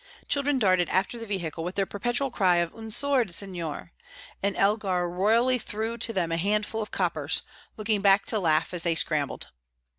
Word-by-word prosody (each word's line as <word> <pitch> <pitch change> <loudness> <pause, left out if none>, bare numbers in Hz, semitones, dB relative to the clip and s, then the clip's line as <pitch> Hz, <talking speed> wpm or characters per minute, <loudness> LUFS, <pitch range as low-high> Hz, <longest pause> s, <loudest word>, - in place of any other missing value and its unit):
Children 285 0 +1
darted 185 -7 +2
after 195 +5 0
the 230 - -7
vehicle 170 -5 -4
with 180 +3 -5
their 195 - +1
perpetual 240 +7 -2
cry 185 -6 +3
of 170 -1 0
"Un 225 -1 -8
sord', 260 -3 +3
signor!" 170 - -3 0.5
and 200 0 -1
Elgar 195 -3 +1
royally 225 +8 +2
threw 220 +1 -4
to 235 0 +2
them 175 -6 -1
a 165 - 0
handful 210 +4 -1
of 210 - -5
coppers, - - 0 0.3
looking 215 -1 0
back 195 0 +4
to 220 - -1
laugh 160 -2 +1
as 175 - +2
they 170 -1 +3
scrambled. 150 -3 -1
200 Hz, 180 wpm, -26 LUFS, 175-225 Hz, 0.5 s, back